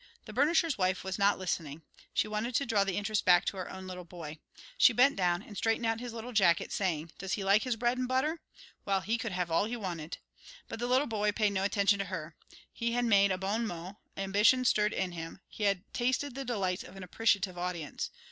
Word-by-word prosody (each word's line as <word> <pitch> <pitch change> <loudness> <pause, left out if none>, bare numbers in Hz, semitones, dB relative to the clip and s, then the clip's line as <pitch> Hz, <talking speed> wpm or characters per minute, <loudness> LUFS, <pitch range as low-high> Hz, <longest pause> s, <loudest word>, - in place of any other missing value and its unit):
The 215 - -9
burnisher's 300 +1 +2
wife 185 0 +1
was 190 +1 -4
not 200 +1 +4
listening. 165 -4 -4 0.3
She - - +1
wanted 215 +3 -3
to 280 - +2
draw 215 -4 +2
the 195 -2 -2
interest 210 0 0
back 180 -1 +5
to 195 - -2
her 185 - -5
own 190 0 -8
little 180 -1 -7
boy. 165 -3 -9 0.4
She 280 - +6
bent 255 +5 +5
down 180 0 +1
and 210 - -12
straightened 225 +3 0
out 225 0 +1
his 245 0 -6
little 230 +2 -7
jacket, 180 -6 +3
saying, 165 -5 -1
"Does 195 0 -3
he 200 - -1
like 200 +2 +4
his 250 -2 -1
bread 240 +2 0
'n 255 - -1
butter? 300 +6 0 0.4
Well, 195 -1 +1
he 225 +5 -1
could 230 -1 -3
have 180 -2 -2
all 165 +5 +3
he 240 +3 -3
wanted!" 175 -6 -5 0.5
But 225 - -7
the 240 - -1
little 260 +3 +3
boy 210 -4 0
paid 210 -1 +2
no 190 - 0
attention 200 0 +2
to 195 - -1
her. 165 -4 -6 0.4
He 235 0 -2
had 245 0 +1
made 200 -3 +5
a 185 - 0
bon 205 +5 -1
mot, 180 +2 -7 0.2
ambition 205 +6 +3
stirred 210 -2 +3
in 190 -3 -2
him, 165 +1 -7
he 210 - -4
had 195 -2 +1
tasted 255 +3 0
the 270 +1 -5
delights 195 -6 -1
of - - -11
an 195 - -8
appreciative 200 -1 +1
audience. 175 -4 -3
200 Hz, 230 wpm, -31 LUFS, 185-230 Hz, 0.5 s, She